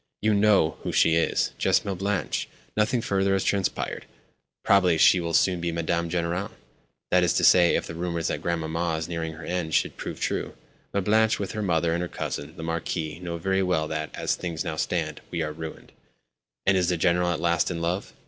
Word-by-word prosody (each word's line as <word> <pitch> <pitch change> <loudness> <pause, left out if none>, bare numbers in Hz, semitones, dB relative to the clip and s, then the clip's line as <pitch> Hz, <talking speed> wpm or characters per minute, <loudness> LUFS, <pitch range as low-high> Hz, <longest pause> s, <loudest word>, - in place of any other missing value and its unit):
"You 110 0 +2
know 100 -6 +3
who - - -3
she 80 - +4
is—just 85 +5 +1
Mlle. 100 - -1
Blanche. 95 +1 -2 0.3
Nothing 115 +3 +1
further 95 -2 +1
has 95 - +1
transpired. 100 -2 -1 0.6
Probably 90 -4 +4
she 90 - +6
will 85 -1 -1
soon 90 -2 +3
be 85 0 -1
Madame 85 0 -1
General—that 85 - -3
is 85 - +2
to - - +1
say, 90 -2 +6
if - - -1
the - - -7
rumours 85 0 -2
that - - -3
Grandmamma 85 0 -1
is 80 - -4
nearing 80 -2 -4
her 80 +2 -10
end 85 -3 -2
should - - +1
prove - - -6
true. - - -2 0.4
Mlle. 100 - 0
Blanche, 110 +2 +3
with 100 -3 -4
her 110 - -4
mother 85 -4 +1
and 85 - -1
her 90 - -2
cousin, 75 -2 -5
the 80 - -6
Marquis, 80 -1 -3
know 85 -2 -4
very 95 +3 0
well 90 -4 +1
that, 80 0 -3
as - - 0
things 85 -3 -4
now - - -3
stand, - - -2
we 85 -2 -2
are 75 0 -4
ruined." 80 0 -8 0.7
"And 95 - +4
is 90 -2 +2
the 90 - +1
General 90 +1 +2
at 85 -3 -1
last 85 0 +1
in 85 -2 -3
love?" 85 +3 -2
85 Hz, 205 wpm, -26 LUFS, 80-95 Hz, 0.7 s, she